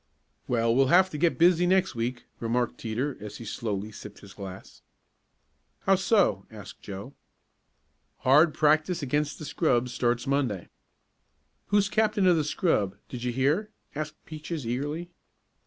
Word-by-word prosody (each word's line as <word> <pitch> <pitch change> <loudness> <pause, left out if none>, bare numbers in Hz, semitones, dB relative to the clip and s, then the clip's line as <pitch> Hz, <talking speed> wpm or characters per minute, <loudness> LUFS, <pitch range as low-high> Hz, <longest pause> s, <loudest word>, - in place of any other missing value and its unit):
"Well, 115 -1 +2
we'll 135 +2 +4
have 185 +6 +5
to 150 - -4
get 170 +1 +2
busy 175 +1 +4
next 190 -1 +2
week," 120 +1 -3
remarked 120 +1 -1
Teeter 125 +5 -2
as 105 -1 -7
he 115 - -9
slowly 105 -1 -4
sipped 105 -1 -11
his 100 0 -13
glass. 95 -2 -10 1.0
"How 195 - +3
so?" 190 - +2
asked 105 -3 -11
Joe. 100 +7 -8 1.1
"Hard 150 +6 +5
practice 155 +2 +2
against 145 +2 -1
the 155 - -8
scrub 125 -6 +1
starts 120 0 0
Monday." 135 -10 -1 1.0
"Who's 205 -1 +3
captain 215 -1 +1
of 180 -2 +6
the 155 - +1
scrub; 145 - 0
did 125 - -6
you 125 - 0
hear?" 145 - +1 0.2
asked 150 0 -4
Peaches 155 -2 -6
eagerly. 145 +8 -3
140 Hz, 145 wpm, -27 LUFS, 115-170 Hz, 1.1 s, of